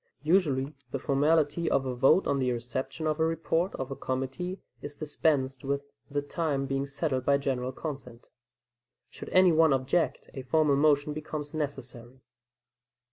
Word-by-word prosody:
Usually 150 -5 +2 0.2
the 135 - -2
formality 150 +4 +2
of 135 - +1
a 130 - -2
vote 135 +9 +4
on 140 - +1
the 130 -1 +1
reception 125 +6 -4
of 155 0 0
a - - +3
report 165 +2 0
of 130 0 -5
a - - -3
committee 135 +10 -3 0.2
is 145 0 -7
dispensed 145 -4 0
with, 140 +1 -3 0.2
the 145 0 -1
time 145 -2 -1
being 135 +1 -2
settled 140 -2 -2
by 140 +1 +3
general 130 -2 -2
consent. 130 -5 -7 0.9
Should - - -9
any 185 -1 +6
one 160 -2 +5
object, 135 +2 0
a 135 - -5
formal 145 +3 +2
motion 145 0 +3
becomes 150 -1 -5
necessary. 130 -4 -5
140 Hz, 155 wpm, -29 LUFS, 130-155 Hz, 0.9 s, any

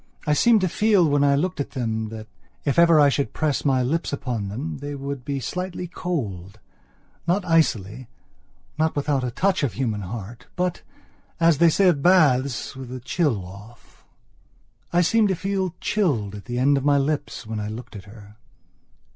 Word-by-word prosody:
I 150 - +2
seemed 220 +7 +4
to 185 - +2
feel 200 -1 +3
when 145 -1 +2
I 140 -1 +4
looked 170 +4 -1
at 140 - -3
them 110 -3 -2
that, 110 0 -8 0.4
if 140 +2 +2
ever 170 -2 +6
I 145 -1 +6
should 140 0 -1
press 155 -3 -1
my 130 -3 +2
lips 160 +7 -1
upon 125 -7 -3
them 125 +11 -5
that - - -15
they 145 0 -4
would 140 -1 -5
be 140 +1 -3
slightly 180 +5 -4
coldnot 105 - -4 0.9
icily, 125 - +1 0.7
not 160 0 +1
without 145 -2 0
a 125 - -1
touch 190 +11 0
of 140 -6 -1
human 110 -5 -2
heat, 110 +4 -8
but, 180 -1 -1 0.6
as 165 -3 +4
they 170 0 +6
say 190 +4 +3
of 160 -6 +3
baths, 140 -8 +3
with 130 -2 -8
the 130 +1 -6
chill 125 - -1
off. 105 +5 -14 0.9
I 175 - +3
seemed 215 +5 +3
to 190 - 0
feel 190 -1 -2
chilled 135 - 0
at 100 -2 -9
the 120 +2 -4
end 140 +3 +3
of 135 - -2
my 145 0 +4
lips 145 -2 -2
when 110 0 -4
I 105 - -4
looked 110 +2 -8
at 100 0 -9
her... 105 0 -14
140 Hz, 185 wpm, -23 LUFS, 115-165 Hz, 0.9 s, ever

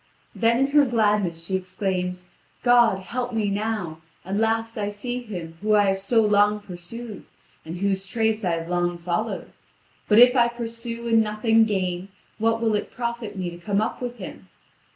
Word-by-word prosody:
Then 230 +1 +2
in 270 +2 +3
her 295 0 +6
gladness 210 -9 +1
she 190 - -1
exclaims: 185 -1 -2 0.4
"God, 240 -4 +5
help 245 +6 -4
me 210 -3 0
now. 200 -6 -3 0.2
At 195 +2 -2
last 225 +1 0
I 205 -2 -2
see 245 +4 -4
him 175 -8 -8
whom 215 0 +3
I 205 -1 +4
have 195 0 0
so 225 +4 +3
long 210 0 +3
pursued, 205 +4 -8 0.4
and 165 +2 -6
whose 195 0 0
trace 220 +2 0
I 175 -2 +1
have 165 0 -3
long 175 0 0
followed. 170 0 -3 0.5
But 210 - +4
if 245 +2 +8
I 240 -2 +5
pursue 235 0 -5
and 225 -1 +5
nothing 220 +1 +3
gain, 185 -3 -2 0.3
what 225 +1 +2
will 225 -2 +2
it 210 - -1
profit 235 -4 -4
me 180 -2 -3
to 170 - -9
come 200 +2 0
up 220 +3 -2
with 245 -1 -4
him? - - -9
210 Hz, 180 wpm, -24 LUFS, 185-230 Hz, 0.5 s, if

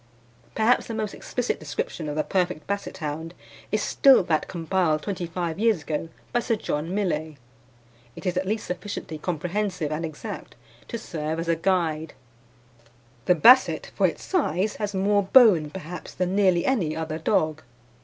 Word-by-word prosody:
Perhaps 225 +3 +3
the 230 - -4
most 215 -2 -3
explicit 245 -1 -3
description 155 +1 -4
of 145 - -4
the 155 - +1
perfect 180 -5 -1
Basset 200 0 -4
hound 160 +3 -5 0.4
is - - +1
still 270 -7 +5
that 160 -3 0
compiled 165 -2 0
twenty 185 -4 -3
five 170 0 -3
years 220 -8 +2
ago 155 +1 -3 0.2
by 240 - +3
Sir 230 -1 0
John 165 -2 -3
Millais. 160 -7 -1 0.8
It - - -10
is 180 -1 0
at 185 +1 -1
least 215 +2 -1
sufficiently 180 -4 -5
comprehensive 180 0 -2
and 155 +2 -2
exact 155 -2 -7 0.3
to 235 - -4
serve 160 -7 -4
as 165 - -3
a 165 - +3
guide: 165 -3 0 1.1
"The 180 - +4
Basset, 250 - +5
for - - +3
its - - -6
size, 210 - 0
has 205 -2 -3
more 200 +2 +3
bone, 195 - +6
perhaps, 180 +1 -8
than 180 +1 -1
nearly 185 -4 +3
any 185 -13 +1
other 160 0 -3
dog. 155 -1 +1
180 Hz, 165 wpm, -25 LUFS, 155-205 Hz, 1.1 s, bone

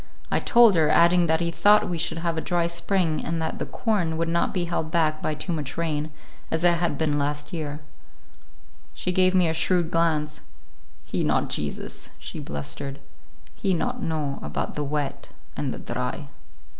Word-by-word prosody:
I - - +3
told 235 -3 +6
her, 160 -3 +3
adding 170 +1 +5
that 160 +1 +2
he 170 0 0
thought 205 +5 +5
we 175 -2 -3
should 165 0 -1
have 165 0 -1
a 160 - -1
dry 175 0 +1
spring 170 -1 0
and 165 0 -2
that 160 0 -3
the - - -3
corn 180 -8 0
would 165 0 0
not 170 +1 +1
be 180 -3 -1
held 160 -2 -2
back 155 -2 +1
by 155 - -1
too 175 +4 -3
much 150 -3 -4
rain, 155 -2 -1 0.4
as 160 +1 -1
it 175 -1 +4
had 170 -5 0
been 150 -1 +1
last 145 +1 -2
year. 150 -2 -4 1.1
She 180 - -2
gave 185 +1 +3
me 180 -2 +4
a 160 - 0
shrewd 170 0 +2
glance. 155 -2 +1 0.6
"He - - -1
not - - +1
Jesus," 75 -1 -4
she - - -8
blustered; 70 - -4 0.5
"he 190 -2 0
not 245 +7 -2
know 155 -6 -2
about - - -3
the 150 - -2
wet 145 -1 -3 0.3
and - - -2
the - - -5
dry." - - -4
165 Hz, 185 wpm, -25 LUFS, 150-175 Hz, 1.1 s, told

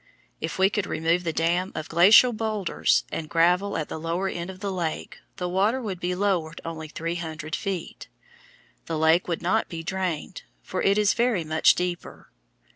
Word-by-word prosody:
If 160 - -4
we 190 +1 +4
could 205 -1 -1
remove 165 +3 0
the 165 - -1
dam 175 +4 0
of 155 - -4
glacial 205 +9 +7
boulders 215 -4 0
and 155 -1 -4
gravel 180 +4 +2
at 155 - -3
the - - -6
lower 170 +4 -2
end 175 -1 -4
of 185 -1 -9
the 200 0 -3
lake, 170 -4 -4 0.2
the 180 - -3
water 200 +8 +1
would 200 -7 -5
be 180 0 -2
lowered 180 -5 -1
only 160 -1 -5
three 165 +2 -4
hundred 160 -1 -5
feet. 195 -4 -5 0.8
The 165 - -2
lake 160 +3 +3
would 170 -1 -3
not 205 +6 +1
be 165 -2 -6
drained, 180 -1 -3 0.2
for 185 - -3
it 200 +1 +3
is 210 -1 +3
very 235 -7 +1
much 155 0 +4
deeper. 180 -1 -5
175 Hz, 185 wpm, -25 LUFS, 165-195 Hz, 0.8 s, glacial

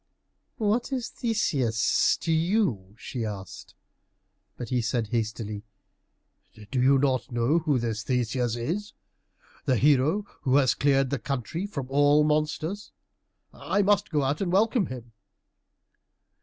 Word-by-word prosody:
"What 220 +4 0
is 255 -4 -2
Theseus 140 - +1
to 165 - -1
you?" 160 - 0
she 125 -1 -5
asked. 100 -3 -7 0.8
But 120 - -6
he 125 -1 +1
said 115 -1 -1
hastily, 110 -2 -3 1.1
"Do 130 - +1
you 135 +2 +5
not 130 -2 0
know 120 +7 +2
who 155 -4 +1
this 115 -2 -2
Theseus 125 -1 -1
is? 170 - -3 0.7
The 130 -4 +2
hero 145 - +3 0.2
who 130 0 +1
has 135 -4 +4
cleared 135 -2 +2
the 140 - -1
country 140 - -3
from 140 -10 -5
all 145 +2 +4
monsters. 155 +6 -1 0.6
I 205 - 0
must 205 -1 +2
go 150 -3 0
out 140 +5 -1
and 185 -3 -1
welcome 215 +2 +2
him." 120 -2 -9
140 Hz, 130 wpm, -26 LUFS, 120-170 Hz, 1.1 s, you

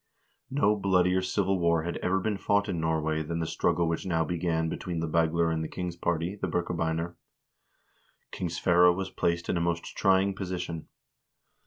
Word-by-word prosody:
No 105 -6 +2
bloodier 95 -2 +2
civil 95 0 0
war 85 -2 +2
had 85 +1 -3
ever 95 +1 0
been 105 +1 -1
fought 100 +1 +2
in 90 -4 -2
Norway 80 -1 0
than 85 +2 -3
the 85 - -1
struggle 85 +1 +1
which 80 0 -1
now 80 -3 0
began 80 0 0
between 85 +1 -4
the 80 - -1
Bagler 85 +1 +2
and 80 0 -1
the - - -3
king's 90 0 -5
party, 85 +2 -1
the - - 0
Birkebeiner. 85 -1 -2 1.1
King 90 - -3
Sverre 90 +1 +4
was 95 +1 -3
placed 85 0 -1
in - - 0
a - - 0
most 85 0 -2
trying 95 0 +3
position. 90 -4 -5
85 Hz, 175 wpm, -28 LUFS, 80-95 Hz, 1.1 s, Sverre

